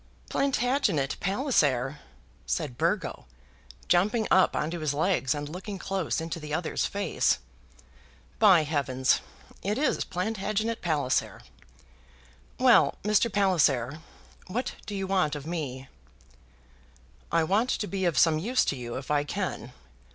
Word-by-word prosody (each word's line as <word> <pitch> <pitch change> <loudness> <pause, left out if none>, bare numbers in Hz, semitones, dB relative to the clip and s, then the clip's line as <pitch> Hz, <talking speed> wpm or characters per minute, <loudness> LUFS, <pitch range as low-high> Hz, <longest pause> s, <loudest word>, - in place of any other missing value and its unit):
"Plantagenet 245 - +1
Palliser?" 150 - +1 0.5
said 125 - -2
Burgo, 165 - -1 0.6
jumping 210 +5 +2
up 185 - +4
on 150 - -1
to 175 - -4
his 150 -2 -1
legs 155 -4 +1
and 145 0 -4
looking 190 +5 -6
close 190 -3 -2
into 165 +1 -4
the 150 -1 -8
other's 160 +2 -1
face. 200 - +1 1.0
"By 190 -7 +6
heavens! 140 -4 +1 0.4
it 205 +3 -1
is 300 - +1
Plantagenet 215 +4 -2
Palliser! 150 -6 0 1.2
Well, - - +5
Mr. 210 +2 +2
Palliser, 155 - +2 0.5
what 230 +8 -3
do 205 - -4
you 195 -1 -2
want 185 -6 +1
of 145 -1 -7
me?" 140 -6 -4 1.4
"I 165 0 +3
want 205 +9 +1
to 210 - 0
be 195 -2 -2
of 170 -3 +1
some 160 -2 +4
use 245 +9 +1
to - - 0
you, 120 -2 -6
if 135 +2 -6
I 145 -1 +2
can. 170 -6 -4
175 Hz, 130 wpm, -27 LUFS, 145-205 Hz, 1.4 s, By